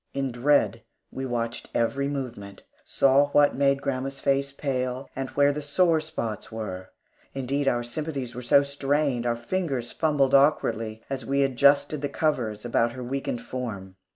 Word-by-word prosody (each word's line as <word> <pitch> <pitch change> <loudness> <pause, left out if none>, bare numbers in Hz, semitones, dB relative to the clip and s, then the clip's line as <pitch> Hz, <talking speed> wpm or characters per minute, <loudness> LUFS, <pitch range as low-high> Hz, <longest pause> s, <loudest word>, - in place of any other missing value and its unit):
In 135 -1 -1
dread 140 +5 +2 0.3
we 130 0 -4
watched 120 -1 -3
every 140 +4 +1
movement, 120 -8 -6 0.2
saw 140 +1 +3
what 145 -1 +5
made 140 0 +2
grandma's 135 0 -3
face 140 0 +1
pale, 130 -2 -3
and 135 0 -3
where 145 0 +4
the 150 +1 -4
sore 160 +2 +2
spots 115 -9 -5
were. 95 -4 -6 0.5
Indeed 135 +1 -1
our 120 -2 +2
sympathies 135 -1 -4
were 125 - -6
so 135 +3 +5
strained, 140 -3 0
our 120 - +1
fingers 130 -1 -3
fumbled 145 -4 +1
awkwardly 115 -6 +2
as 135 -2 -4
we 140 +4 +1
adjusted 140 +2 +3
the 145 - -2
covers 120 -8 -1
about 115 0 +1
her 130 0 -7
weakened 125 -1 -3
form. 100 -7 -6
135 Hz, 155 wpm, -26 LUFS, 120-140 Hz, 0.5 s, what